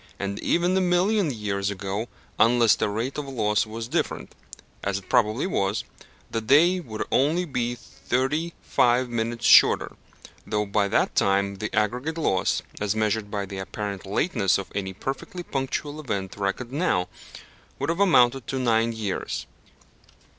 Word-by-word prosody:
And 100 0 -4
even 175 +2 +1
a 190 - +3
million 185 +1 +2
years 105 -5 -2
ago, 100 +3 -3 0.3
unless 115 -1 +5
the - - -1
rate 115 +8 -3
of 145 - -5
loss 110 -5 0
was 115 +1 -6
different 160 +7 -2 0.5
(as 100 0 -1
it 100 - -10
probably 110 +2 +2
was), 100 - 0 0.5
the 115 - -1
day 160 +11 +4
would 110 -10 -5
only 160 +7 +2
be 120 -5 -2
thirty 135 +8 -2
five 125 +1 +2
minutes 115 0 -2
shorter, - - +6 0.5
though 105 0 -1
by 100 0 +1
that - - +1
time 100 0 +1
the 105 +2 -3
aggregate 125 +9 0
loss, 95 - +1 0.2
as 105 0 -1
measured 110 -1 0
by 100 -1 -3
the 95 0 -7
apparent 100 0 -5
lateness 105 - +1
of 100 - -7
any 95 -1 -3
perfectly 135 - -5
punctual 145 +1 -3
event 100 -10 -4
reckoned 100 +5 -3
now, 140 - 0 0.7
would - - -2
have 170 - -3
amounted 135 -10 +4
to 135 - -2
nine 115 -2 +2
years. 105 -4 -3
115 Hz, 155 wpm, -25 LUFS, 100-140 Hz, 0.7 s, shorter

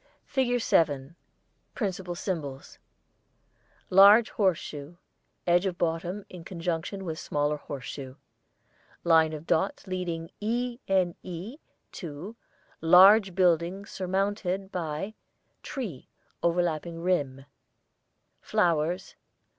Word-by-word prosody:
[ILLUSTRATION 250 -3 +1
7] 145 - +2
FIG.7 160 +5 -19 0.6
Principal 190 -5 -3
Symbols: 150 -8 -5 1.1
Large 200 +4 +8
horse 190 -5 +2
shoe, 150 +3 -8 0.5
edge 175 +2 +3
of 180 -2 -3
bottom, 175 +4 -2
in 180 -2 -10
conjunction 175 +2 -4
with 160 -2 -4
smaller 145 +1 -1
horse 145 -2 -7
shoe. 135 -2 -7 0.9
Line 160 -2 +5
of 155 0 -7
dots 190 +5 0
leading 180 -3 -4
E.N.E. 210 - -2 0.3
to 175 +5 -7 0.5
Large 190 +3 +7
building 180 +1 +2
surmounted 195 0 -2
by 170 +4 -3 0.5
Tree, 230 - -6 0.3
overlapping 170 -1 0
rim. 140 -7 0 1.0
Flowers. 170 +2 0
175 Hz, 95 wpm, -28 LUFS, 160-195 Hz, 1.1 s, Large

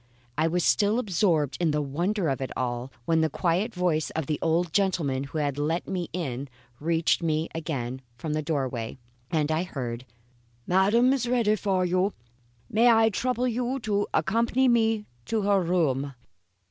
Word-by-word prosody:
I 155 +2 +2
was 175 +1 0
still 210 +2 +3
absorbed 170 - +1
in 170 - +3
the 150 0 +1
wonder 170 +7 -1
of 135 -2 -1
it 130 - -2
all, 125 +1 -2
when 165 +2 +2
the 160 - +2
quiet 180 - 0
voice 175 -5 0
of 160 -2 -1
the 150 +1 -2
old 165 0 +1
gentleman 160 -9 +1
who 145 +3 -6
had 145 -2 -1
let 160 +4 -1
me 180 -3 -3
in 140 -6 -4 0.3
reached 165 +2 +1
me 160 -1 0
again 130 -6 -4 0.2
from 150 +4 -3
the 155 - 0
doorway, 135 -7 -2 0.3
and 155 -2 0
I 155 +1 +1
heard: 125 -8 -5 0.6
"Madam 210 +8 +4
is 250 -3 -1
ready 230 -4 +3
for 190 -3 0
you. 185 +3 +1 0.5
May 230 +3 +4
I 225 -1 +5
trouble 250 +4 0
you 250 +2 -1
to 205 -2 0
accompany 235 +6 +2
me 225 -3 +2 0.2
to 220 -2 -1
her 200 -1 +3
room." 145 -6 0
170 Hz, 170 wpm, -26 LUFS, 145-210 Hz, 0.6 s, I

